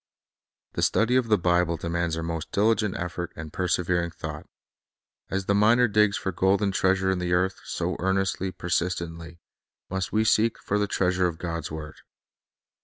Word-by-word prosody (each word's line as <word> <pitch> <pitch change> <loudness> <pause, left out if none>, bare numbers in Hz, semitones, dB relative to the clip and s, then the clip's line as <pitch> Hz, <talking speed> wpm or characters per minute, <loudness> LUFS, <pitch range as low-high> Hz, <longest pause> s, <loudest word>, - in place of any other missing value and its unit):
The - - -2
study 115 +3 +2
of 130 -2 +2
the 105 -1 +4
Bible 85 -1 +2
demands 85 0 -2
our 80 - -3
most 80 -1 -4
diligent 105 -1 +2
effort 90 0 -4
and 80 -2 -8
persevering 90 -1 0
thought. 75 -2 -7 0.8
As 95 0 -2
the 100 - +2
miner 115 +4 +5
digs 105 -1 +3
for 95 - -2
the 85 - -20
golden 100 +1 +2
treasure 95 0 +2
in 95 - -1
the 90 0 -1
earth, 95 +2 +1
so - - -2
earnestly, 95 0 0
persist 90 0 -1
ently, 85 0 -7 0.5
must 95 -1 -2
we 110 +1 +2
seek 110 0 +3
for 105 - -1
the 105 - +1
treasure 90 -1 +1
of 85 -2 -4
God's 85 -1 -4
word. 75 0 -7
90 Hz, 175 wpm, -26 LUFS, 85-100 Hz, 0.8 s, miner